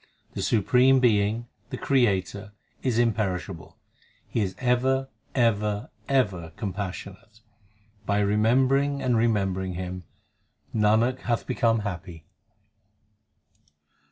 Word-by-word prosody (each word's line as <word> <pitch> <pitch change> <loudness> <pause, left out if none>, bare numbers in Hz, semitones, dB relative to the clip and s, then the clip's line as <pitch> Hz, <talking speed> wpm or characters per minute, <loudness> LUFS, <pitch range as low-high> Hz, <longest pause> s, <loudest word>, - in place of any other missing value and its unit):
The - - -4
Supreme 125 +5 +4
Being, 110 -1 +2 0.2
the - - -5
Creator, 100 -6 0 0.3
is 125 -4 0
imperishable; 105 -6 -1 0.5
He 115 - -1
is 95 -2 -2
ever, 130 +2 +1 0.3
ever, 105 -3 +1 0.2
ever 95 - 0
compassionate: 100 +2 -6 0.7
By 105 0 +2
remembering 130 +7 +2
and 125 -2 +2
remembering 95 -5 0
Him, 90 0 -5 0.7
Nanak 110 +4 +2
hath 120 -1 -1
become 115 -3 +1
happy. 85 -5 -6
105 Hz, 95 wpm, -26 LUFS, 95-125 Hz, 0.7 s, Supreme